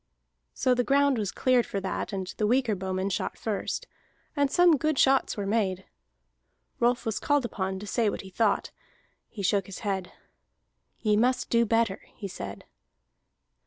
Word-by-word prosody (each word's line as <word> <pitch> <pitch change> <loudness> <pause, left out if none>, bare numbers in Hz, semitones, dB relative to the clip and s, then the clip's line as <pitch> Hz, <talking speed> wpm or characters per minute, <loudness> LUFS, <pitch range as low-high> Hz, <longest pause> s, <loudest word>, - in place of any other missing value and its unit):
So 255 - +2
the 245 0 +1
ground 275 -1 +3
was 205 -3 -1
cleared 255 -2 +2
for 200 - -2
that, 190 +2 -3
and 190 -2 -3
the 210 - +2
weaker 245 -1 +2
bowmen 190 0 -2
shot - - -2
first, 215 -3 -3 0.5
and 285 -2 +2
some 350 +1 +5
good 310 +1 0
shots 270 -3 +3
were 200 - -2
made. 195 -3 0 0.9
Rolf 245 +1 +2
was 220 -1 -1
called 290 -3 +1
upon 190 -4 -3
to 200 - -7
say 220 +1 +1
what - - -4
he 190 - -12
thought. 210 +1 +1 0.6
He 205 - -7
shook 195 0 +1
his 195 - -8
head. 190 -3 -2 0.9
"Ye 215 -2 +3
must 250 +4 +1
do 235 -1 +3
better," 225 -3 +1
he 200 - -6
said. 100 - -7
220 Hz, 165 wpm, -27 LUFS, 195-250 Hz, 0.9 s, some